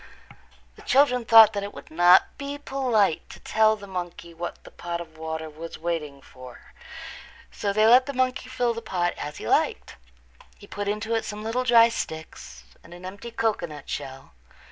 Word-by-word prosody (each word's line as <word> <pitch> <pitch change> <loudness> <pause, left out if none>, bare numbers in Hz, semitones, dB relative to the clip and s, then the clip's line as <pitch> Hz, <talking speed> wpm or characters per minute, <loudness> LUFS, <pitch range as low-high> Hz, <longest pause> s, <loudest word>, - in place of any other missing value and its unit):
The - - -14
children 250 -3 +3
thought 225 -1 +8
that 200 - -2
it 200 +1 -7
would - - -12
not 175 +3 +5
be 280 0 -5
polite 250 - 0
to - - -12
tell 220 0 +2
the 205 -2 -11
monkey 175 -3 -7
what 175 +1 -7
the - - -14
pot 170 0 -5
of 160 -2 -10
water 160 0 -5
was 160 +2 -9
waiting 155 -4 -4
for, 125 -1 -14 0.8
so 200 - -2
they 215 +2 +3
let 250 +4 +6
the 280 - -4
monkey 255 0 -1
fill 245 -2 0
the 230 - -6
pot 180 -5 -1
as 150 0 -7
he - - -7
liked. - - 0 0.6
He - - -14
put 205 0 -5
into 215 +2 -2
it 225 - 0
some 210 0 -7
little 230 +3 -1
dry 230 -1 +6
sticks 155 - -7 0.2
and 170 - -13
an 175 +1 -12
empty 200 +5 -8
cocoanut 190 -10 -3
shell. 135 -2 -7
200 Hz, 185 wpm, -25 LUFS, 165-230 Hz, 0.8 s, thought